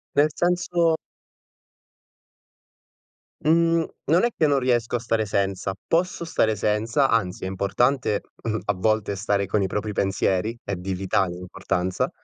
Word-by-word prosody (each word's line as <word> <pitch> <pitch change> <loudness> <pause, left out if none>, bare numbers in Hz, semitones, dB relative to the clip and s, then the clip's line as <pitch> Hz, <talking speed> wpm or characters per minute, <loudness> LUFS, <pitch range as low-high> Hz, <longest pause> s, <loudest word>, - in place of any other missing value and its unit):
Nel 145 +2 +5
senso 175 -1 +1 2.5
Mhmm, 165 +1 +3 0.2
non 165 +5 +3
è 240 - +4
che 155 - +4
non 140 -1 +3
riesco 120 -2 +1
a - - 0
stare 115 -1 0
senza. 95 -1 -1
Posso 170 +1 0
stare 110 -9 +1
senza, 110 +7 +1
anzi 95 -6 0
è - - -2
importante, 105 +4 +1 0.2
mhmm, 110 -1 -1
a 105 - +1
volte 105 +1 0
stare 100 0 0
con 100 +2 +1
i 95 - +1
propri 105 +2 -3
pensieri, 95 +3 0
è 100 - -3
di 95 +2 -4
vitale 95 -1 0
importanza 90 0 -2
110 Hz, 140 wpm, -24 LUFS, 95-140 Hz, 2.5 s, Nel